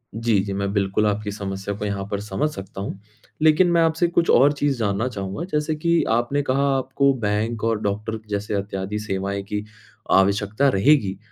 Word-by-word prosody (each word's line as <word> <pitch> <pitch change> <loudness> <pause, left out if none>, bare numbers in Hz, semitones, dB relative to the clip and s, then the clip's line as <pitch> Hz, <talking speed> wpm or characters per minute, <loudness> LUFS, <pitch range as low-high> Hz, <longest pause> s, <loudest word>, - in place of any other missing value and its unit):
जी, 115 -2 +2
जी। 100 - -4
मैं 100 0 -2
बिल्कुल 100 +1 +1
आपकी 105 0 -2
समस्या 100 0 -4
को 105 - -4
यहाँ 100 -1 -3
पर 100 - -1
समझ 105 +8 -1
सकता 95 0 -8
हूँ। 100 0 -5 0.4
लेकिन 160 +3 +5
मैं 170 -1 +4
आपसे 165 +1 +2
कुछ 170 0 +1
और 140 +4 +6
चीज़ 145 -2 0
जानना 105 +2 0
चाहूँगा, 100 - -4
जैसे 150 +1 0
कि 170 +2 +2
आपने 120 +5 +1
कहा 135 +1 +1
आपको 135 +1 +1
बैंक 110 +1 -1
और 115 -2 +1
डॉक्टर 105 +2 -2
जैसे 100 0 -2
इत्यादि 100 +1 -4
सेवाएँ 100 -1 -3
की, 105 +1 -4 0.5
आवश्यकता 100 +7 +3
रहेगी। 100 -4 +3
105 Hz, 180 wpm, -22 LUFS, 100-140 Hz, 0.5 s, और